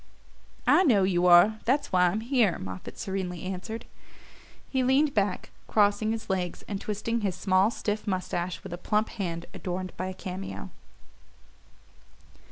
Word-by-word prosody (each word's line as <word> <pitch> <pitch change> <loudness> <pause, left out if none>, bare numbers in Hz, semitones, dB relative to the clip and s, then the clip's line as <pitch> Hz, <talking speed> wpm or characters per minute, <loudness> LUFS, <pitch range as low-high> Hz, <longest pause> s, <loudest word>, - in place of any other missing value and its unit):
"I - - +6
know 225 - +4
you 180 -1 +2
are: 180 +5 +7
that's 270 +5 +1
why 180 -1 +4
I'm 200 +5 -1
here," 235 -6 +2
Moffatt 95 0 -8
serenely 185 -3 -4
answered. 190 +5 -5 0.8
He 265 - 0
leaned 275 +3 +3
back, 200 -3 -1 0.2
crossing 210 +1 +3
his 225 -1 -4
legs, 180 -2 -2
and 200 -1 -4
twisting 225 +2 -2
his 195 -4 -1
small 190 +2 +3
stiff 210 -2 -3
moustache 185 -2 -2
with - - -7
a 175 - -6
plump 210 +3 0
hand 170 -6 -4
adorned 185 0 -4
by 185 - -2
a 185 - -5
cameo. 185 - -6
195 Hz, 150 wpm, -28 LUFS, 180-220 Hz, 0.8 s, are